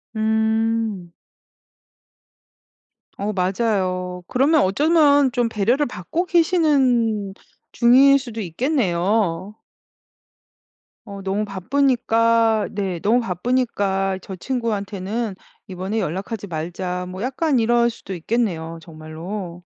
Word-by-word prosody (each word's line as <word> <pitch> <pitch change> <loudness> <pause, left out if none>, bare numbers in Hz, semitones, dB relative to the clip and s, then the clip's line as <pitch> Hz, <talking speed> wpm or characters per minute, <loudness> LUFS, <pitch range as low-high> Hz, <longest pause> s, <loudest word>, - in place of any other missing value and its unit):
음. 220 -3 0 2.0
어 205 +2 -2
맞아요. 185 -2 -1
그러면 285 +5 +3
어쩌면 285 - +4
좀 245 -1 +1
배려를 230 +6 +1
받고 245 - -3
계시는 270 - +2 0.4
중일 260 +4 +6
수도 235 -5 -6
있겠네요. 195 - 0 1.5
어 200 -2 -8
너무 195 +2 -1
바쁘니까 230 +1 +1
네 195 -4 -3
"너무 230 +4 +3
바쁘니까 195 -3 -1
저 190 0 -8
친구한테는 210 -2 -3 0.3
이번에 190 +4 -3
연락하지 195 +3 -4
말자." 180 +2 -4
뭐 185 +1 -7
약간 265 +3 0
이럴 235 +1 +3
수도 225 -4 -8
있겠네요, 170 -4 -2
정말로. 170 +3 -8
215 Hz, 215 characters per minute, -21 LUFS, 185-240 Hz, 2.0 s, 중일